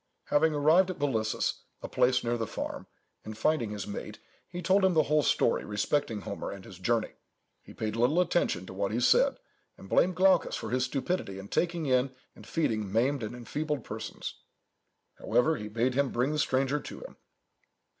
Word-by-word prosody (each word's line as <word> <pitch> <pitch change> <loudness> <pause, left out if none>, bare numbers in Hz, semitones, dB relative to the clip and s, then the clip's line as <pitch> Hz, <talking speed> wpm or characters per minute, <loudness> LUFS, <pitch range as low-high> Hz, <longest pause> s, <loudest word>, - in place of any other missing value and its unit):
Having 155 +1 +3
arrived 160 +6 +4
at 185 - -4
Bolissus, 115 -7 0 0.2
a - - -3
place 125 0 +2
near 120 0 0
the 115 -2 -2
farm, - - -5 0.4
and 110 0 -8
finding 120 -2 +1
his 105 -2 -5
mate, 105 +1 -6 0.3
he 175 - -6
told 190 +3 +3
him 190 -2 +4
the 155 - +5
whole 150 +1 +2
story - - +2
respecting 105 +1 -1
Homer 100 - -5
and 100 -1 -8
his 95 - -12
journey. 115 +3 0 0.5
He - - -14
paid 110 -1 -3
little 125 +9 +3
attention 175 - +1
to 95 - -9
what 100 +1 -1
he 115 - 0
said, 125 - +4 0.4
and 95 - -12
blamed 180 - +3
Glaucus 190 +1 +4
for - - -5
his 125 0 +1
stupidity 135 - -2
in 95 +1 -9
taking 170 -2 0
in 130 0 +1 0.2
and - - -14
feeding 110 - -1
maimed 125 +6 +1
and 110 +2 -5
enfeebled 145 +3 -3
persons. 110 +1 -6 0.8
However, 155 +6 +2
he 105 - -6
bade 115 +4 0
him 140 +1 +1
bring 125 +5 0
the 155 - -1
stranger 135 0 +1
to - - -9
him. - - -11
125 Hz, 185 wpm, -29 LUFS, 110-155 Hz, 0.8 s, the